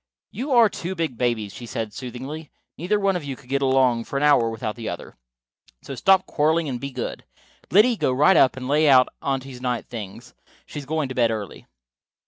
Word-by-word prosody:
"You 255 +8 -5
are 235 -2 +7
two 190 -2 -5
big 165 -7 -2
babies," 115 -4 -1
she 120 - -9
said 110 -1 -4
soothingly. 130 +6 -7 0.3
"Neither 185 +7 0
one 195 -1 +1
of 175 - -3
you 140 -2 -5
could 125 - -19
get 140 +1 0
along 130 -3 +2
for 140 - -4
an 140 - 0
hour 140 -6 +4
without 110 -1 -4
the 115 -2 -5
other. 85 - -8 0.7
So - - -7
stop 185 +9 +3
quarreling 160 +1 +1
and 125 -3 -4
be 140 - -4
good. 125 -3 -5 0.5
Liddy, 215 +6 +5
go 130 - +1
right 150 +8 +4
up 130 - +4
and 130 -1 -5
lay 150 +2 +3
out 130 -2 +6
Aunty's 135 -2 -4
night 125 -2 -2
things. 115 +1 -9 0.3
She 150 - -7
is 140 - -10
going 155 -1 -1
to - - -4
bed 120 -2 +3
early." 105 -4 -6
135 Hz, 210 wpm, -23 LUFS, 120-155 Hz, 0.7 s, are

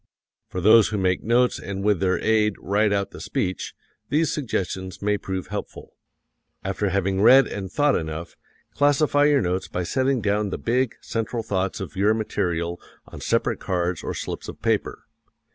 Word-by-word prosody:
For 90 - -4
those 110 +3 +7
who 105 - -2
make 90 -2 +1
notes 120 +2 +2
and 100 0 -5
with 105 -3 +2
their 95 0 +1
aid 105 -2 +2
write 105 +2 +1
out 100 -1 0
the - - -10
speech, 90 - -3 0.3
these 155 +3 +1
suggestions 95 - -3
may 105 +1 +1
prove 95 -2 -5
helpful: - - -7 0.7
After 95 +1 -1
having 95 0 0
read 130 +5 +8
and 95 -3 -6
thought 145 +2 +2
enough, 80 +1 -4 0.4
classify 145 0 +3
your 145 -2 +4
notes 90 +1 -1
by 90 - -3
setting 130 +7 +1
down 105 -1 0
the - - -3
big, 125 +1 0
central 115 +1 -3
thoughts 95 +1 -2
of 95 0 -7
your 105 +3 +3
material 85 -6 -2 0.3
on - - -10
separate - - 0
cards 90 -2 -1
or - - -4
slips - - -5
of - - -8
paper. - - -1
100 Hz, 170 wpm, -24 LUFS, 95-115 Hz, 0.7 s, read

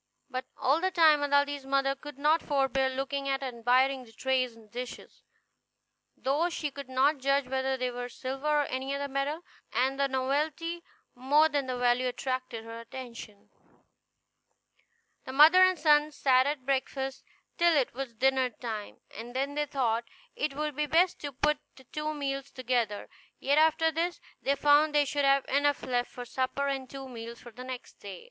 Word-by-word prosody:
But 255 0 -3
all 285 +5 +2
the 375 - +2
time 320 -5 +5
Aladdin's 285 0 +1
mother 275 0 +1
could 295 0 -11
not 305 +3 +3
forbear 270 -2 +1
looking 275 +1 -3
at 270 0 -1
and 250 -3 -5
admiring 255 +3 +3
the 230 - -16
tray 260 +3 +1
and 225 -3 -15
dishes, 245 +1 -8 1.0
though 290 +7 +1
she 305 -4 -3
could 275 -1 -9
not 270 +3 +2
judge 275 +1 +2
whether 265 0 -1
they 255 -1 -1
were 245 0 -5
silver 265 +4 -5
or - - -1
any 265 +1 -3
other 280 0 -3
metal, 280 +4 -2 0.3
and 265 +2 0
the 280 - +3
novelty 300 +6 -1 0.3
more 290 +5 +3
than 285 -3 -1
the 255 -1 -2
value 245 +1 +2
attracted 255 -2 -3
her 230 0 -8
attention. 230 -3 -10 1.7
The 260 - -6
mother 315 +6 +8
and 370 -1 +5
son 300 -1 +4
sat 260 -2 +3
at 285 -3 -3
breakfast 270 0 -2 0.4
till 340 -2 +5
it 265 - +1
was 250 -2 -6
dinner 260 +1 +2
time, 220 -3 -7
and 240 +3 -8
then 275 +2 -1
they 295 0 -1
thought 235 -5 0 0.3
it 290 -2 -2
would 300 -1 -2
be 300 +1 -1
best 345 +4 +3
to 285 - -5
put 295 +3 +1 0.2
the 265 - -16
two 305 +3 -4
meals 275 -1 -3
together; 240 -5 -1 0.3
yet 285 +3 +2
after 320 +1 +3
this 340 +2 -2 0.2
they 280 - +1
found 295 +1 +4
they 290 -1 +5
should 285 0 0
have 275 0 +4
enough 285 +1 +1
left 245 -1 -1
for 245 - -8
supper, 260 +3 -2
and 270 -2 -3
two 270 -1 -8
meals 235 -1 -8
for 240 - -12
the 250 +3 -10
next 255 -1 -8
day. 195 -3 -8
270 Hz, 180 wpm, -29 LUFS, 255-290 Hz, 1.7 s, mother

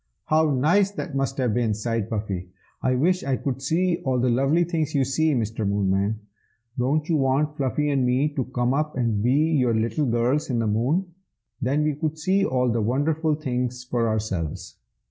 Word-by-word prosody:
"How 155 0 +3
nice 160 +9 +3
that 185 -6 -6
must 135 0 -1
have 125 -5 +1
been!" 115 -2 +1
sighed 115 0 -2
Puffy. 100 -5 -3 0.3
"I 130 0 +1
wish 180 +8 +1
I 135 -1 0
could 135 0 -3
see 170 +5 +1
all 130 -1 0
the 125 0 +2
lovely 135 +8 +2
things 160 -3 -2
you 135 -2 +3
see, 155 +3 +1
Mr. 110 -2 -2
Moonman! 100 +1 0 0.5
Don't 140 +4 0
you 165 - +2
want 140 +2 +1
Fluffy 140 +1 -1
and 135 -2 +1
me 125 +4 +2
to 130 -4 -2
come 125 0 -1
up 150 0 -1
and 115 -5 0
be 120 +3 +2 0.2
your 125 -7 +2
little 115 +6 0
girls 120 +6 +1
in 125 - 0
the 115 - 0
Moon? 140 - 0 0.5
then 140 +4 +1
we 155 0 +1
could 155 +2 -3
see 190 +5 +1
all 125 -6 +1
the 115 0 0
wonderful 150 +7 +1
things 125 -4 -3
for 120 -2 -1
ourselves." 100 -8 -3
130 Hz, 190 wpm, -24 LUFS, 115-150 Hz, 0.5 s, How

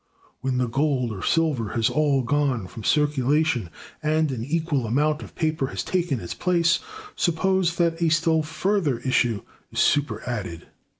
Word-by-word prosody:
When 130 -1 -1
the 125 -1 +1
gold 135 -1 0
or 100 -4 -6
silver 150 -10 +1
has 115 -1 +2
all 145 -3 +2
gone 135 -4 0
from 110 +4 -9
circulation, 145 - +1 0.3
and 155 -1 +1
an 120 -4 -4
equal 150 -3 -1
amount 150 +6 +1
of - - -11
paper 155 -4 0
has - - -4
taken 175 -8 -1
its 90 - -5
place, 170 -2 +2 0.4
suppose 180 0 +1
that 170 -1 0
a 165 - +3
still 160 0 +2
further 160 - 0
issue 120 -4 +1 0.3
is - - -9
superadded. 120 - 0
150 Hz, 155 wpm, -24 LUFS, 125-165 Hz, 0.4 s, a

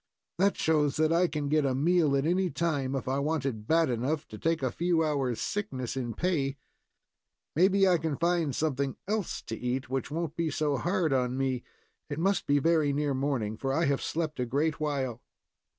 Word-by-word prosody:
"That 200 +1 +3
shows 150 -3 +2
that 155 +1 +2
I 175 +2 +4
can 150 -2 -3
get 155 +1 +2
a 135 -2 +1
meal 155 0 +3
at 135 - 0
any 180 +2 +2
time, 145 -6 -1
if 135 - -3
I 135 +1 0
want 150 0 -1
it 110 -5 -3
bad 165 0 +4
enough 130 +5 -1
to 105 - -9
take 165 -3 0
a 130 - +1
few 170 +3 +1
hours' 135 -6 -1
sickness 135 - -3
in 120 -4 -3
pay. 145 -7 0 1.0
Maybe 195 +4 +4
I 180 -2 +4
can 155 -3 -2
find 170 -5 +1
something 140 -3 -1
else 210 -2 -2
to 115 - -5
eat 125 +2 -3
which 135 0 -2
won't 160 +1 -3
be 165 -1 0
so 150 -2 0
hard 175 -1 +1
on 125 -1 0
me. 130 -2 -1 0.5
It 145 - -4
must 195 +4 +1
be 145 - +4
very 155 0 +3
near 145 0 0
morning, 130 -6 -1
for 135 +2 -2
I 165 +2 +2
have 140 -2 +1
slept 155 -3 -3
a 125 - +1
great 150 +6 0
while." 135 -6 -2
145 Hz, 200 wpm, -29 LUFS, 135-165 Hz, 1.0 s, I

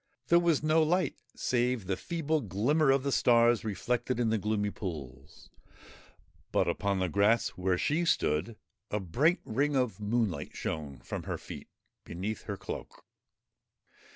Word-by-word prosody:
There 170 - +7
was 170 -4 +2
no 155 +1 +4
light 165 -1 +1 0.2
save 125 -3 0
the 95 +1 0
feeble 160 - -1
glimmer 125 - +1
of 135 0 +4
the 140 - 0
stars 120 -2 +4
reflected 120 +4 -1
in 115 -2 +2
the 110 - +1
gloomy 105 0 0
pools; 70 - -8 1.0
but, - - +2
upon 100 -1 0
the 95 -1 +1
grass 100 +6 +3
where 90 0 -1
she 155 - +1
stood, 90 - +1 0.3
a 105 - -1
bright 135 - +2
ring 140 +6 0
of 125 -5 0
moonlight 105 -3 -1
shone 70 -5 -4
from - - -6
her - - -3
feet - - -9 0.4
beneath 95 +5 -5
her - - -4
cloak. - - -8
115 Hz, 150 wpm, -30 LUFS, 95-140 Hz, 1.0 s, There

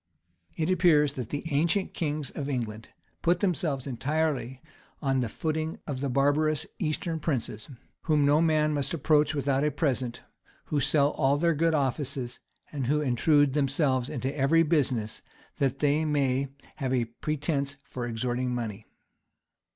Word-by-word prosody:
] 85 0 -46
It 160 +2 0
appears 155 -6 +4
that 125 -5 -5
the 145 - -3
ancient 170 +7 +1
kings 150 -3 -2
of 145 -2 -4
England 115 -4 -4 0.3
put 175 +1 +2
themselves 165 -8 0
entirely 140 -1 -1 0.4
on 135 -2 +1
the 120 -3 -1
footing 160 +4 -2
of 140 -4 -4
the 140 0 -1
barbarous 145 +3 +2
Eastern 160 +1 -1
princes, 130 -8 -3 0.4
whom 150 -3 +3
no 145 +2 +4
man 155 -2 +3
must 145 +3 -1
approach 150 0 +3
without 140 -1 +1
a 150 - +3
present, 130 -4 -1 0.4
who 150 - 0
sell 145 0 +3
all 140 0 +2
their 170 +2 +2
good 160 +1 +2
offices, 130 -3 -2 0.3
and 140 -5 -3
who 150 +3 +2
intrude 145 +1 +3
themselves 135 -2 +1
into 135 0 -3
every 150 +4 +4
business, 130 -9 0 0.4
that 135 -1 +1
they 150 +2 +2
may 140 -3 +1 0.3
have 130 -3 0
a 120 -2 +1
pretence 140 +3 -2
for 125 -1 -5
extorting 125 +2 -1
money. 110 -3 -5
145 Hz, 150 wpm, -28 LUFS, 130-155 Hz, 0.4 s, appears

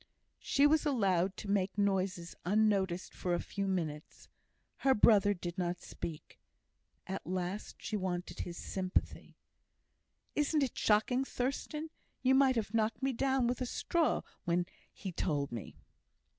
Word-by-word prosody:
She 280 - +3
was 305 +1 +5
allowed 195 - +2
to - - -7
make 195 0 0
noises 190 -3 0
unnoticed 195 -2 +1
for 175 -1 -1
a - - -1
few 200 -1 -3
minutes. 160 -5 -3 0.5
Her 265 -1 +3
brother 205 -1 +5
did 175 0 -5
not 175 0 -1
speak. 160 -3 -7 0.7
At 190 +1 -5
last 185 +3 -3
she 215 - -4
wanted 185 -3 -3
his 175 -1 -5
sympathy. 185 -1 -2 1.0
"Isn't 295 0 +2
it 260 - -2
shocking, 220 +5 +3
Thurstan? 290 +5 -3 0.3
You 260 0 +5
might 265 -1 +5
have 215 -2 -2
knocked 225 +3 0
me 270 0 +2
down 265 +1 +2
with 245 +2 0
a 255 - 0
straw 335 +5 +1 0.2
when 175 -1 +1 0.3
he 190 - -6
told 145 -5 -1
me." 115 -6 -6
200 Hz, 145 wpm, -33 LUFS, 180-255 Hz, 1.0 s, was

